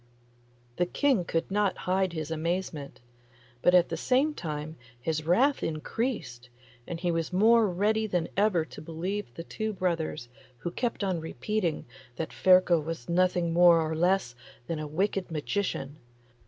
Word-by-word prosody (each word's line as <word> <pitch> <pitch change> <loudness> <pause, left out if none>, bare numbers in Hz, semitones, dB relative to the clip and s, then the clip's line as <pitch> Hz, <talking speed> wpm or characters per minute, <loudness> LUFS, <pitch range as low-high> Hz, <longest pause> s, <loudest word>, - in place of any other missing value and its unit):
The 175 - +1
King 255 -3 +1
could 165 +2 -2
not 205 -1 +1
hide 185 -1 +1
his 160 -1 -4
amazement, 160 -4 -3 0.6
but 180 - +5
at 175 -1 +5
the - - -2
same 275 +4 +2
time 155 - -5 0.2
his 155 +3 -2
wrath 265 +11 +3
increased, 155 - -3 0.4
and 170 - -5
he 175 0 0
was 165 0 -2
more 220 +4 +5
ready 215 +4 +1
than 175 -4 -1
ever 195 -5 +2
to - - -11
believe 170 +1 -4
the 165 - -6
two 220 +5 -4
brothers, 165 -8 -2 0.3
who 175 - -5
kept 235 +1 -2
on 185 -3 0
repeating 165 - -2 0.3
that 160 +4 -5
Ferko 185 -2 +5
was 160 -6 -6
nothing 175 -1 +2
more 175 0 +7
nor 160 -1 0
less 175 -6 +1 0.3
than 165 +2 -3
a 155 - -4
wicked 190 +5 -1
magician. 155 -3 -3
175 Hz, 155 wpm, -28 LUFS, 160-195 Hz, 0.6 s, more